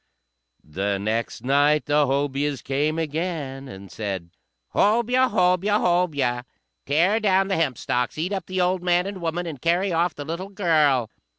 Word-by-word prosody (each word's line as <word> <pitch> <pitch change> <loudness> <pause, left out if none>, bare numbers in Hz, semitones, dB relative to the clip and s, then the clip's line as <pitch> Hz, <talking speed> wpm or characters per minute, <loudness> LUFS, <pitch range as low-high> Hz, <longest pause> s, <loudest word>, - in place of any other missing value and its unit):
The 100 +6 -2
next 110 +4 -3
night 145 +3 +3
the 145 0 +2
Hobyahs 140 0 -1
came 145 +4 0
again, 155 -4 -3
and 95 -5 -11
said, 95 -6 -5 0.4
"Hobyah! 240 +5 +3
Hobyah! 190 +1 +2
Hobyah! 145 -9 +1 0.4
Tear 175 +10 +3
down 195 -2 +2
the 195 - +1
hempstalks, 125 -5 -1
eat 175 +6 -2
up 195 - -4
the 185 0 -3
old 180 0 +1
man 180 0 +2
and 195 -2 -6
woman, 170 +1 -2
and 150 -7 -7
carry 180 +3 +1
off 170 0 +1
the 145 - -7
little 170 +5 -5
girl!" 155 - +2
160 Hz, 155 wpm, -24 LUFS, 135-180 Hz, 0.4 s, night